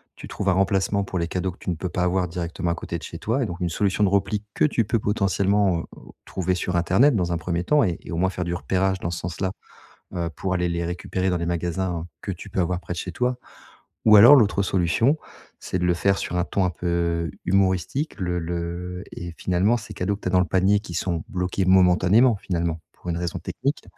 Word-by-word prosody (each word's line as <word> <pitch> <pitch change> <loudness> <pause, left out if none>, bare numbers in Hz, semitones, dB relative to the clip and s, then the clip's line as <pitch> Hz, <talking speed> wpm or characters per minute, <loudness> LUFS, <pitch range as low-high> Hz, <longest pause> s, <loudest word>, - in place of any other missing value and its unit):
tu - - -10
trouves 100 - -2
un - - +4
remplacement 95 +1 +1
pour 95 -2 -3
les 85 - -1
cadeaux 90 +2 -2
que 90 - -18
tu - - -5
ne 90 - 0
peux 90 +3 -4
pas 90 - -1
avoir 90 0 +1
directement 85 0 -3
à - - -1
côté 85 - -5
de 80 - -12
chez - - -7
toi. 120 +5 0
Et - - 0
donc, 85 -4 -6
une 90 -2 -1
solution 100 +4 0
de 100 - +4
repli 100 +1 0
que - - +3
tu 120 -7 +1
peux 115 - +1
potentiellement, 100 -2 +1
heu, - - -9 0.4
trouver 90 0 -1
sur 90 0 -2
internet, 95 - +4
dans 90 -4 0
un - - 0
1er 85 +1 -2
temps 150 +9 +3
et 90 -6 0
et - - -10
au 85 - -3
moins 95 +2 +2
faire 90 - -3
du 85 - -2
repérage 95 +1 0
dans 85 - -3
ce 85 - -4
sens 85 +1 -6
là, 95 -1 0 0.6
heu, 85 -2 -2
pour 95 -1 -2
aller 90 -1 0
les 85 0 -2
récupérer 90 +2 -2
dans 90 - +1
les 85 - -3
magasins, 85 0 -2 0.2
que - - -3
tu - - -10
peux - - -1
avoir 90 0 0
près 90 - -6
de - - -6
chez 90 - -4
toi. 125 +6 -1 0.7
Ou 110 - +8
alors, 115 +8 +10
l'autre 105 -6 +3
solution, 95 - +2 0.4
c'est 90 - -3
de 90 - 0
le 90 - +3
faire 95 +3 +1
sur 90 - -3
un 90 - +1
ton 95 - 0
un - - +1
peu 85 -1 -1 0.2
humoristique, 95 - 0
le 90 -2 -1
le 85 +2 -4
et 85 -1 -7
finalement 95 +6 +2
ces 110 -2 -9
cadeaux 100 +1 -1
que 100 - -14
tu - - -4
as - - -3
dans 90 - +4
le 90 - +3
panier 95 +3 +3
qui 100 -4 -9
sont 85 -1 -2
bloqués, 90 +1 -1
momentanément, 95 +6 +5
finalement, 85 -4 -2
pour 90 - -9
une 85 - -1
raison 85 +1 -3
technique. 135 - -3
90 Hz, 250 wpm, -24 LUFS, 85-100 Hz, 0.7 s, alors